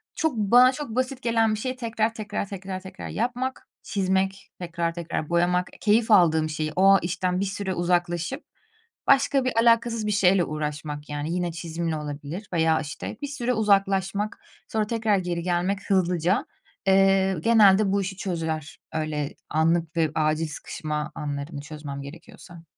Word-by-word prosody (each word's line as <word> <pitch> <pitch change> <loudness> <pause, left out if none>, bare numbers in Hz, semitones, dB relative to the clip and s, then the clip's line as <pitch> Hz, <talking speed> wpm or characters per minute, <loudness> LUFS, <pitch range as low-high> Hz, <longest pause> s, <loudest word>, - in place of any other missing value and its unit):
Çok 320 -6 0
bana 245 +5 +6
çok 290 0 -6
basit 260 +1 -1
gelen 225 -2 +2
bir 215 - -6
şeyi 255 +2 -3
tekrar, 225 -2 -1
tekrar, 210 -2 -4
tekrar, 190 -1 -5
tekrar 190 0 -8
yapmak, 250 +3 -3 0.2
çizmek, 190 -1 -1
tekrar, 170 -1 -2
tekrar 165 -2 -4
boyamak, 175 +1 +2
keyif 220 +1 +3
aldığım 160 -5 +5
şeyi, 155 0 -2
o 195 +1 +6
işten 180 +1 -1
bir 200 - 0
süre 195 -1 -3
uzaklaşıp 175 - -1 0.6
başka 275 -1 +4
bir 255 - 0
alakasız 230 -1 +3
bir - - +1
şeyle 195 -2 +4
uğraşmak 150 -1 -5
yani. 145 +2 -3
Yine 180 -1 -1
çizimle 165 -1 -3
olabilir 150 +6 -6
veya 160 -1 +3
işte, 155 +7 -6
bir 285 - -3
süre 250 -3 -2
uzaklaşmak, 200 -1 +1 0.3
sonra 215 -1 -1
tekrar 220 -3 +1
geri 175 -2 -2
gelmek 180 +3 -1
hızlıca. 180 -1 +2 0.4
Eee, 195 0 +4
genelde 205 0 +5
bu 200 0 +2
işi 190 0 -4
çözer, 160 -5 -4
öyle 155 -2 -2
anlık 165 +1 +1
ve 160 -3 +2
acil 155 +1 +1
sıkışma 150 0 -5
anlarını 145 0 -5
çözmem 150 -2 -7
gerekiyorsa. 165 +3 -12
185 Hz, 150 wpm, -25 LUFS, 160-210 Hz, 0.6 s, bana